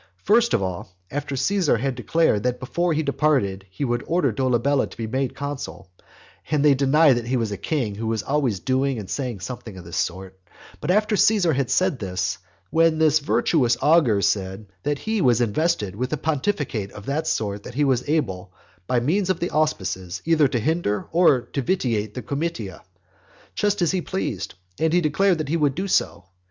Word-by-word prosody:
First 235 +2 +4
of 100 - 0
all, 90 0 -5
after 145 0 -3
Caesar 160 +1 +2
had 135 +3 -1
declared 120 -1 +1
that 125 +2 -1
before 170 +7 -1
he 155 +1 0
departed 135 -10 0
he 95 +9 -4
would 120 +1 -1
order 160 -6 +2
Dolabella 130 +3 +1
to - - -14
be 115 - -3
made 130 +3 -2
consul, 140 -10 -6 0.6
(and 150 -1 +2
they 145 - +7
deny 140 +2 +4
that 120 -1 -3
he 130 +1 +1
was 115 -3 -1
a - - -2
king 125 -4 -2
who 110 +3 -4
was 110 -2 -1
always 135 -8 0
doing 130 +3 0
and 105 -3 -6
saying 125 -6 -4
something 110 +1 -7
of 90 - -10
this 85 - -6
sort,) 95 +1 -3 0.4
but 150 - -5
after 210 +3 +3
Caesar 200 -6 +3
had 135 -2 -1
said 185 -8 +1
this, 90 -2 -2 0.3
then 165 -1 +4
this 155 -1 +4
virtuous 140 -4 +2
augur 140 -11 +4
said 95 +1 -1 0.2
that 145 +5 -1
he 220 +5 -2
was 125 -6 +4
invested 120 - 0
with 125 +4 -3
a 155 - 0
pontificate 145 - -2
of 100 - -10
that 145 +3 -2
sort 100 -2 -1
that 125 - -10
he 145 - +2
was 130 -1 +1
able, 95 - -1 0.4
by 125 - +2
means 180 +10 0
of 185 -2 +1
the 175 - -2
auspices, 95 - -1
either 160 -3 +4
to 125 - -1
hinder 135 -5 0
or 165 -7 +4
to 140 - -4
vitiate 115 - -1
the 125 - -5
comitia, 140 - -4 0.7
just 205 -3 0
as 170 - +2
he 185 -1 0
pleased; 120 - -4 0.2
and 160 0 +1
he 175 - +4
declared 175 +4 +2
that 155 -3 -4
he 165 - +1
would 145 -4 +1
do 190 +4 -2
so. 100 - 0
135 Hz, 195 wpm, -23 LUFS, 110-160 Hz, 0.7 s, they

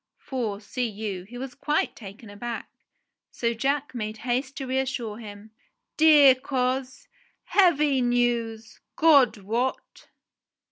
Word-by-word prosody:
For, 230 -7 -4
see 245 +4 -3
you, 205 -4 -5
he 240 +5 -11
was 260 0 -6
quite 300 0 -1
taken 205 0 -11
aback; 230 +3 -6 0.6
so 235 -1 -1
Jack 275 +5 -1
made 215 -2 -4
haste 260 +3 -2
to 270 - -4
reassure 255 -4 -2
him. 210 -1 -11 0.4
"Dear 300 -4 +7
coz, 260 - -3 0.4
heavy 300 -8 +3
news, 235 -2 -1 0.2
God 285 -8 +5
wot 230 +6 -3
245 Hz, 120 wpm, -25 LUFS, 220-270 Hz, 0.6 s, Dear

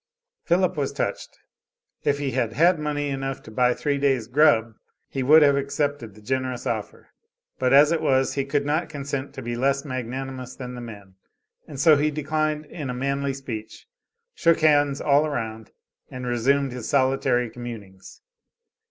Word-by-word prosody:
Philip 180 0 +2
was 140 -2 -1
touched. - - -4 0.7
If 145 -1 +1
he 140 -2 -2
had 120 -3 -1
had 170 +6 +4
money 145 -1 -2
enough 135 -1 -4
to 110 - -12
buy 125 +2 +2
three 140 -1 -1
days' 135 -5 +1
"grub" 115 -3 +3 0.3
he 135 - -4
would 150 +4 +7
have 140 -1 +5
accepted 140 -5 -2
the 105 - -16
generous 130 0 -2
offer, 110 -3 -4 0.5
but 130 -1 +1
as 145 +3 +7
it 170 - +1
was, 130 0 +2
he 140 - -1
could 140 +1 -1
not 155 +4 0
consent 140 -2 -4
to 135 - -7
be 120 0 -3
less 140 +3 0
magnanimous 130 0 -5
than 125 -2 -7
the 125 - -7
men, 100 -5 -11 0.5
and 140 - -9
so 155 0 +6
he 150 +2 +2
declined 155 0 -2
in 145 -2 -7
a 125 - -3
manly 140 +1 -1
speech; 115 -5 -8 0.5
shook 165 -2 +2
hands 145 -2 +3
all 145 0 +4
around 110 -6 -5 0.4
and 125 0 -7
resumed 130 +3 +1
his 125 -2 -6
solitary 130 -3 +2
communings. 110 -6 -10
135 Hz, 170 wpm, -24 LUFS, 125-145 Hz, 0.7 s, would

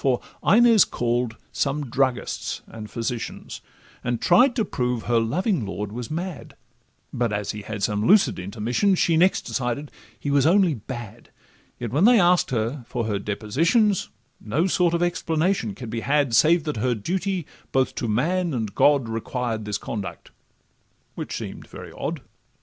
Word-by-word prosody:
For 130 -3 +2 0.2
Inez 230 0 +6
call'd 120 -1 -1 0.2
some 145 +1 -1
druggists 130 0 -1
and 110 -1 -9
physicians, 115 0 -5 0.4
And 120 -1 -1
tried 245 +8 +4
to 225 -5 +1
prove 125 -7 -2
her 120 -1 +2
loving 160 - 0
lord 100 +1 -4
was 120 +1 -6
mad; 170 0 -5 0.6
But 120 -2 0
as 105 -1 -2
he 105 - -7
had 105 -1 -6
some 105 +1 0
lucid 205 - +4
intermissions, 115 - 0
She 165 - +3
next 180 +4 +3
decided 130 +3 -3 0.3
he 145 - -2
was 140 0 +4
only 185 -1 +4
bad; 120 -2 -8 0.5
Yet 120 -3 -5
when 150 +9 +3
they 240 -1 +7
ask'd 180 -1 +4
her 120 +3 -2
for 120 -2 -2
her 105 -2 -1
depositions, 165 - +1 0.3
No 140 +11 0
sort 175 -2 +2
of 170 - +1
explanation 165 - 0
could 120 -1 -8
be 115 - -2
had, 140 0 +1
Save 155 +8 +5
that 150 -5 -3
her 125 +3 +1
duty 185 - -2 0.3
both 130 -1 +1
to 120 - -3
man 165 +8 0
and 110 -4 -3
God 140 -5 +4
Required 115 0 -3
this 105 -1 -2
conduct—which 105 -2 -9
seem'd - - -7
very - - -10
odd. - - -4
130 Hz, 160 wpm, -24 LUFS, 115-170 Hz, 0.6 s, they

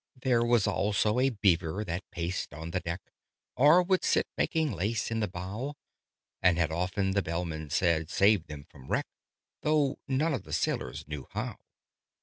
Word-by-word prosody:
There 125 -2 +2
was 120 -3 +3
also 105 +3 +1
a 135 +1 +4
Beaver, 95 -4 +1
that 90 -1 -5
paced 85 -3 -3
on 80 +2 -6
the 95 - 0
deck, 85 +1 -5 0.5
Or 150 +7 +6
would 185 +1 +1
sit - - +3
making 160 -3 +1
lace 110 +4 -1
in 115 - 0
the 105 - 0
bow: 100 +10 -5 0.7
And 90 -2 +4
had 85 -2 +1
often 95 +4 0
(the 100 +1 +2
Bellman 80 -3 -4
said) 80 -1 +1
saved 100 -3 +3
them 75 -2 -8
from 70 -5 -15
wreck, - - 0 0.6
Though 150 -2 +2
none 145 +4 +1
of 130 - -2
the - - -9
sailors 65 +2 -2
knew 75 -2 -6
how. - - -3
95 Hz, 170 wpm, -29 LUFS, 85-120 Hz, 0.7 s, Or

